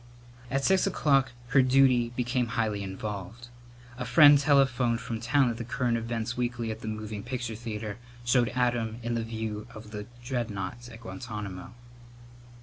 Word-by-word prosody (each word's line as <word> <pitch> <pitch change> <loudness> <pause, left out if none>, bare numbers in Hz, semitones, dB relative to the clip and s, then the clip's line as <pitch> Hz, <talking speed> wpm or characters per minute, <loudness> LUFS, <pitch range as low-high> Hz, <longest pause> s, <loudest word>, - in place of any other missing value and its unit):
At 135 +2 0
six 190 0 +4
o'clock 135 -8 +2 0.2
her 135 +1 +5
duty 130 -2 +4
became 125 0 0
highly 110 -3 0
involved. 100 +4 -6 0.5
A - - -2
friend 145 +4 +7
telephoned 130 -5 +3
from 120 -2 -4
town 130 +3 +3
that 115 - -3
the 120 - -4
current 120 0 0
events 115 0 -2
weekly 120 -2 -2
at 110 +1 -7
the - - -6
moving 110 -1 -4
picture 120 -1 -4
theatre 110 -1 -5 0.3
showed 120 -1 +3
Adam 120 -3 0
in 120 +1 -1
the 115 -1 -1
view 110 -1 -4
of 110 -1 -10
the 105 -1 -6 0.2
dreadnoughts 120 -2 -4
at 115 -1 -12
Guantánamo. 110 -3 -7
120 Hz, 155 wpm, -28 LUFS, 110-125 Hz, 0.5 s, friend